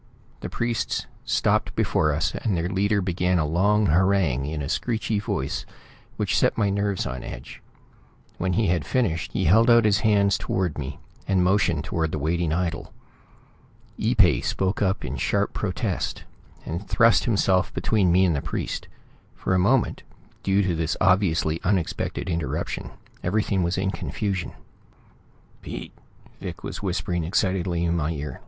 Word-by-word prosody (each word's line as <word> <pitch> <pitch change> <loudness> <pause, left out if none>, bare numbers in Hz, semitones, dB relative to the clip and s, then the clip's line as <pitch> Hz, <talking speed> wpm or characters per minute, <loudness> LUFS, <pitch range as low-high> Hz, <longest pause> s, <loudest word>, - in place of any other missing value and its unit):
The - - -6
priests 120 -1 -1 0.2
stopped - - +1
before 75 -1 +2
us 75 +2 0
and 100 -6 -1
their 85 +1 -1
leader 100 +2 +1
began 90 0 +1
a 80 - +1
long 100 +7 +2
harangue 85 -6 +2
in 75 -1 -3
a - - -3
screechy 110 - -1
voice 65 -9 -2 0.5
which - - 0
set - - +2
my 100 -3 +2
nerves 100 -1 0
on 65 0 -5
edge. - - -9 0.8
When 90 0 0
he 110 +5 +2
had 85 -4 +1
finished 85 - -1
he - - 0
held 115 +8 +5
out 115 -1 +6
his 100 -2 +3
hands 100 -2 +3
toward 90 -6 -1
me, 70 0 -5 0.3
and 95 -2 +3
motioned 90 -5 +2
toward 80 -1 -1
the - - -2
waiting 80 +2 0
idol. 85 0 -2 1.0
Ee - - 0
pay - - +5
spoke 95 0 -1
up 95 -1 0
in 65 +2 -4
sharp - - 0
protest, - - -2 0.4
and 85 +5 -5
thrust 115 0 +4
himself 95 -5 +2
between 100 -5 +1
me 95 +2 +5
and 85 -4 +2
the 70 - -1
priest. - - -4 0.5
For - - -1
a 90 - +3
moment, 120 +7 +2 0.4
due 100 +1 +2
to 95 -2 0
this 80 0 -1
obviously 90 -4 +2
unexpected 90 -3 -1
interruption, 85 -3 -3 0.3
everything 100 +1 0
was 85 +1 0
in 95 +1 0
confusion. 100 -3 -3 1.1
"Pete!" - - -7 0.5
Vic - - -7
was - - -5
whispering 90 -3 -1
excitedly 90 -1 0
in 85 0 +1
my 80 -2 0
ear. 75 -4 -5
90 Hz, 160 wpm, -24 LUFS, 80-100 Hz, 1.1 s, out